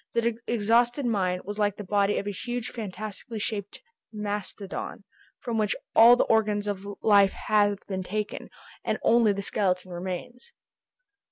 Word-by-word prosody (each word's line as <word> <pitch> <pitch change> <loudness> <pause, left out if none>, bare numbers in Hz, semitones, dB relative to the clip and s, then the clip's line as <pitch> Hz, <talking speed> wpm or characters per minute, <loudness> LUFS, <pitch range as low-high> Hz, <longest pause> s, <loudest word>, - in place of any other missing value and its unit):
The 235 -1 0
exhausted 235 +4 +2
mine 185 -6 0
was 205 +2 -6
like 205 -1 +1
the 210 - -6
body 200 +1 +1
of - - -2
a 205 - -2
huge 240 +3 -4
fantastically 215 +1 -6
shaped 205 - -4 0.3
mastodon, 205 -2 -5 0.4
from 235 -2 -2
which 210 -1 +1 0.2
all 235 +2 +9
the - - +3
organs 210 -2 +1
of 200 -2 -3 0.2
life 200 -3 +5
have 205 -1 +2
been 190 -2 -3
taken, 210 +3 -4 0.3
and - - 0
only 230 -2 +5
the 200 0 -3
skeleton 185 -3 -1
remains. 185 +8 -6
210 Hz, 150 wpm, -27 LUFS, 200-225 Hz, 0.4 s, all